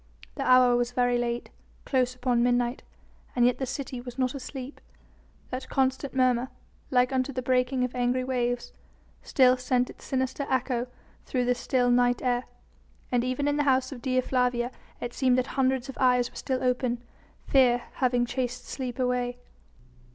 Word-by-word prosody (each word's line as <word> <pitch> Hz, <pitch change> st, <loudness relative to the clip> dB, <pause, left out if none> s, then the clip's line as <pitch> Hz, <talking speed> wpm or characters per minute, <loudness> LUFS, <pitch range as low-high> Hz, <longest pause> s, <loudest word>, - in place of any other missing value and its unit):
The 280 Hz, -, -6 dB
hour 255 Hz, -2 st, +5 dB
was 240 Hz, 0 st, 0 dB
very 245 Hz, -1 st, +2 dB
late, 240 Hz, 0 st, -3 dB, 0.3 s
close 255 Hz, -2 st, +1 dB
upon 245 Hz, -1 st, +1 dB
midnight, 245 Hz, 0 st, +1 dB, 0.5 s
and 240 Hz, -1 st, +4 dB
yet 245 Hz, 0 st, +2 dB
the 265 Hz, -, -2 dB
city 260 Hz, -1 st, -5 dB
was 245 Hz, 0 st, -9 dB
not 255 Hz, -1 st, 0 dB
asleep. 265 Hz, 0 st, -7 dB, 0.7 s
That 255 Hz, +1 st, -5 dB
constant 265 Hz, 0 st, 0 dB
murmur 255 Hz, -1 st, +2 dB, 0.4 s
like 250 Hz, +1 st, +3 dB
unto 260 Hz, +1 st, 0 dB
the 255 Hz, -1 st, -4 dB
breaking 250 Hz, 0 st, +1 dB
of 250 Hz, -, -2 dB
angry 250 Hz, +1 st, 0 dB
waves 245 Hz, -1 st, -2 dB, 0.5 s
still 255 Hz, -1 st, +4 dB
sent 250 Hz, 0 st, 0 dB
its -, -, -17 dB
sinister 260 Hz, +1 st, -2 dB
echo 255 Hz, -1 st, 0 dB, 0.4 s
through 250 Hz, -2 st, 0 dB
the 250 Hz, -, +3 dB
still 245 Hz, 0 st, +1 dB
night 245 Hz, 0 st, +3 dB
air, 245 Hz, -1 st, +1 dB, 0.7 s
and 245 Hz, -1 st, +2 dB
even 255 Hz, +3 st, -1 dB
in 290 Hz, 0 st, +1 dB
the 295 Hz, -, +2 dB
house 260 Hz, +1 st, +2 dB
of 255 Hz, -4 st, -8 dB
Dea 255 Hz, 0 st, +1 dB
Flavia 250 Hz, -1 st, 0 dB, 0.3 s
it 240 Hz, 0 st, -5 dB
seemed 255 Hz, -2 st, +2 dB
that 255 Hz, -, +1 dB
hundreds 265 Hz, -1 st, +1 dB
of 270 Hz, -, -9 dB
eyes 250 Hz, -1 st, +3 dB
were -, -, -24 dB
still 260 Hz, -2 st, -2 dB
open, 250 Hz, -1 st, 0 dB, 0.4 s
fear 245 Hz, -3 st, +4 dB
having 245 Hz, -2 st, +2 dB
chased 245 Hz, 0 st, -3 dB
sleep 250 Hz, -3 st, -5 dB
away. 250 Hz, -1 st, 0 dB
250 Hz, 170 wpm, -27 LUFS, 245-260 Hz, 0.7 s, hour